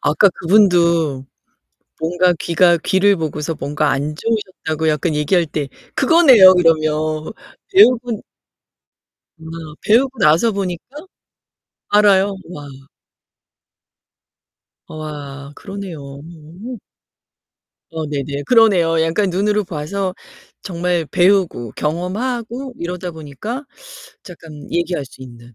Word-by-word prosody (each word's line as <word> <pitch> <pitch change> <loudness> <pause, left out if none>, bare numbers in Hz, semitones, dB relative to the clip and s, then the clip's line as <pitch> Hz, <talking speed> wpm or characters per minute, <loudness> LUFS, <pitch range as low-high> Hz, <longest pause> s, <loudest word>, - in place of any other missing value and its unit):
아까 155 +7 +4
그분도 170 -7 +2 0.7
뭔가 175 +2 +2
귀가 170 0 +3
귀를 195 +4 +2
보고서 155 -1 -3
뭔가 150 +1 -1
안 145 +2 -2
좋으셨다고 185 -7 -2
약간 150 +1 -1
얘기할 165 +4 +1
때 150 -2 -4 0.3
그거네요, 265 - +7
그러면. 155 -2 +1 0.4
배우분 245 - +4 1.2
아, 160 - -19 0.4
배우고 255 +4 +2
나서 160 +10 +4
보니까 185 -4 -3 1.1
알아요. 200 -1 +3
와. 145 -5 -9 2.2
어아 145 -2 -8
그러네요. 195 -3 -8 0.2
오. 170 - -11 1.1
어, 160 -1 -4
네네. 145 -1 -4
그러네요. 180 -8 +4
약간 175 +5 0
눈으로 205 +3 0
봐서 180 +3 -4 0.5
정말 175 -2 -2
배우고 180 - +1
경험하고 235 - -3
이러다 180 +1 -5
보니까 160 - -7 0.6
작감 160 -4 -12
얘기할 170 -3 -2
수 130 - -15
있는. 120 -1 -14
170 Hz, 225 characters per minute, -18 LUFS, 155-200 Hz, 2.2 s, 그거네요